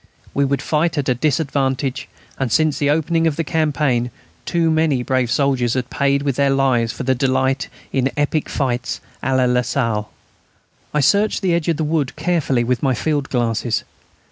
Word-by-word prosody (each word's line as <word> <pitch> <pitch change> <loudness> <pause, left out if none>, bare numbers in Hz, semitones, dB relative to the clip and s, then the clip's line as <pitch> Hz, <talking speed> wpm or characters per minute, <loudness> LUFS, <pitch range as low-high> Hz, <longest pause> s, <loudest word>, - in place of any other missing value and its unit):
We 140 0 +2
should 140 0 -1
fight 160 +2 0
at 140 -2 0
a - - +4
disadvantage, 135 -1 -1 0.3
and 135 -4 -1
since 155 +1 +2
the 145 - +1
opening 165 +2 +2
of 155 - 0
the 165 - -1
campaign 150 -6 0 0.4
too 170 -2 +2
many 155 -5 +2
brave 130 -1 0
soldiers 130 -2 +1
have 125 -1 -2
paid 140 0 +1
with 140 -3 -1
their 140 -1 +3
lives 130 -4 +2
for - - -6
their 130 +1 +2
delight 130 0 0 0.3
in 135 0 +2
epic 145 +1 0
fights 125 -3 -2 0.2
à 130 0 +1
la 130 - +3
Lasalle. 120 -3 0 0.8
I 150 - +1
searched 200 +8 +2
the 180 -2 +2
edge 170 -2 0
of 165 -3 +1
the 160 - -1
wood 150 -3 -1
carefully 155 -8 0
with 125 +1 0
my 135 -3 +1
field 145 -1 -1
glasses. 115 -2 0
135 Hz, 180 wpm, -20 LUFS, 125-155 Hz, 0.8 s, a